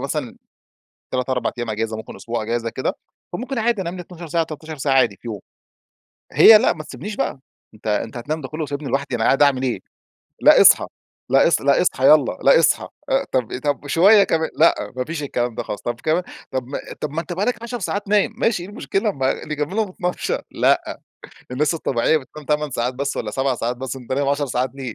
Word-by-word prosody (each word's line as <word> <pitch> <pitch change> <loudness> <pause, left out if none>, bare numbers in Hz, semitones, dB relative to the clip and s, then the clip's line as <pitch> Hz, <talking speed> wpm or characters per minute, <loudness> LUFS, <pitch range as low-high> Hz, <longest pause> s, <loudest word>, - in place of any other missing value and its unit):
مثلًا 140 -2 -4 0.8
3، 130 0 -2
4 125 -1 0
أيام 120 -1 -3
أجازة 110 +1 -2
ممكن 110 - -9
أسبوع 115 -1 -4
أجازة 115 +1 -2
كده، - - -2 0.4
فممكن 260 +1 -3
عادي 225 -3 +1
أنام 170 0 -4
لى 180 - -6
12 175 -1 -10
ساعة، 165 +1 +1
13 155 0 -8
ساعة، 135 0 0
عادي 120 -6 +3
في - - -9
يوم. 105 -3 -5 0.9
هي 220 -1 +9
لا 240 - +3
ما 155 -2 -8
تسيبنيش 150 - -7
بقى 135 - -2 0.3
أنت 110 - -15
أنت 110 +2 -1
هتنام 150 +7 -3
ده 130 - -7
كله 155 +1 -5
وسايبنى 145 -1 -4
لوحدي 135 -1 -1
أنا 115 - -1
قاعدة 140 +2 +5
أعمل 135 -2 +1
إيه؟ 130 -2 -1 0.6
لأ - - +7
أصحى، - - +6 0.4
لأ - - +5
أص - - +2
لأ - - +3
أصحى - - +1
يلّا - - +5
لأ - - +6
أصحى. - - +2 0.2
آآ - - +1
طب 125 -1 -1
طب 145 -1 -1
شوية 200 +7 +6
كمان 160 -4 0
لأ، 165 - +5 0.2
ما 125 - -1
فيش 160 -2 -5
الكلام 120 -4 -2
ده - - -3
خلاص، 105 - -6
طب 120 - -4
كمان 160 +3 +1 0.3
طب 130 -2 -2 0.4
طب 150 - -2
ما 160 +3 -2
أنت 170 +1 -6
بقى 190 +4 -1
لك 235 -1 -2
عشر 235 0 -5
ساعات 205 0 -3
نايم، 210 +1 +2
ماشي 225 -7 +1
إيه 185 - -9
المشكلة؟ 205 0 -1
ما 135 -6 -2
نكملهم 165 +8 -2
12، 180 -1 -2
لأ - - +3 0.7
الناس 150 +6 0
الطبيعية 145 -1 +1
بتنام 150 +1 -8
8 150 0 0
ساعات 125 0 -2
بس 140 +2 -3
والّا 105 - -3
7 135 +2 0
ساعات 120 +1 -3
بس، 130 0 -5
أنت 130 -1 -7
نايم 140 +1 0
10 145 0 0
ساعات 125 0 -1
ليه 130 -5 -6
145 Hz, 215 wpm, -21 LUFS, 125-170 Hz, 0.9 s, هي